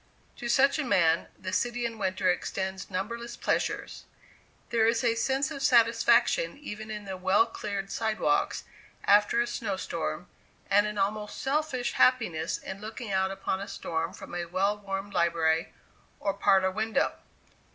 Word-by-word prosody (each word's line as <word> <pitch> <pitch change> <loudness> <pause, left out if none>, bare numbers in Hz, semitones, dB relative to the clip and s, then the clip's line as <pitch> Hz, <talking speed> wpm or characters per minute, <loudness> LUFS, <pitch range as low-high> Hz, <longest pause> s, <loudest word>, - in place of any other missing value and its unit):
To 240 - -5
such 275 +5 +4
a - - +1
man, 170 -9 +3
the 185 0 -6
city 245 0 0
in 230 -1 -4
winter 185 -1 0
extends 190 +1 -2
numberless 235 +5 -4
pleasures. - - -2 0.7
There 225 -2 +3
is 230 +2 +2
a 235 -2 +3
sense 265 +5 0
of 280 -2 -6
satisfaction 235 - +4
even 215 -7 -7
in 210 -1 -6
the 190 -1 -5
well 190 +4 +4
cleared 200 -3 -5
sidewalks 225 - 0 0.4
after 205 +3 +4
a - - +1
snow 225 -5 -3
storm, 75 - -4 0.4
and 205 +1 +5
an 210 0 -5
almost 210 +1 -2
selfish 270 -3 -1
happiness 175 -11 +2
in 190 +1 -8
looking 220 0 -6
out 190 0 +2
upon 195 0 -3
a 200 - -5
storm 165 +1 -3
from 190 - -11
a 175 0 -2
well 190 +4 +1
warmed 195 0 -5
library 165 -1 +1 0.5
or 200 - -1
parlor 190 -1 +3
window. 220 +3 0
210 Hz, 155 wpm, -28 LUFS, 190-235 Hz, 0.7 s, and